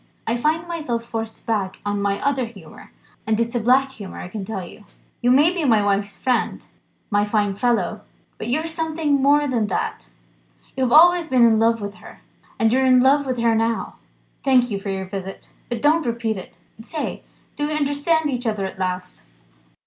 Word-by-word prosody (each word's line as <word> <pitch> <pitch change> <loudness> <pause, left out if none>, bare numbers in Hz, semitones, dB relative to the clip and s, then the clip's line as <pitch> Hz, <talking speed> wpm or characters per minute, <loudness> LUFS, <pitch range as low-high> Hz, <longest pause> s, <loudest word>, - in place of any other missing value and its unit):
I 225 - 0
find 315 +7 0
myself 300 -9 -3
forced 225 -1 -6
back 200 -4 -1
on 205 0 -1
my 200 0 0
other 270 -3 +1
humour 195 -9 -13 0.4
and 220 0 +1
it's 235 0 -1
a 240 - +1
black 260 +4 +3
humour, 205 -7 -9
I - - -7
can 205 +1 -5
tell 190 -2 -5
you. 205 +4 -14 0.4
You 245 - +2
may 290 +7 +5
be 350 -3 -2
my 225 -7 +3
wife's 200 0 0
friend, 255 -1 -1 0.5
my 205 0 +3
fine 205 -1 0
fellow, 210 -2 0 0.4
but - - -5
you're 305 +7 0
something 320 -3 -1
more 290 +2 +4
than 235 -5 0
that. 185 - -3 0.7
You 260 - +1
have 240 - -1
always 345 +2 +6
been 255 -2 +5
in 220 -2 +4
love 230 0 +2
with 200 0 -5
her - - -13 0.4
and 225 -2 +2
you're 265 +1 +3
in 255 -1 +5
love 275 +2 +3
with 255 -1 -1
her 230 -1 +3
now. 225 0 -1 0.5
Thank 250 -3 +3
you 200 - -2
for 195 - -6
your 190 -1 -3
visit, 195 0 -7 0.2
but 240 -2 -4
don't 315 +3 +4
repeat 230 -2 -1
it. 185 - -10 0.3
Say! 300 +7 -5 0.3
do 295 0 -1
we 305 - -2
understand 295 +1 +1
each 245 -2 -3
other 210 -3 -1
at 190 - -7
last?" 180 - -4
235 Hz, 195 wpm, -22 LUFS, 205-280 Hz, 0.7 s, always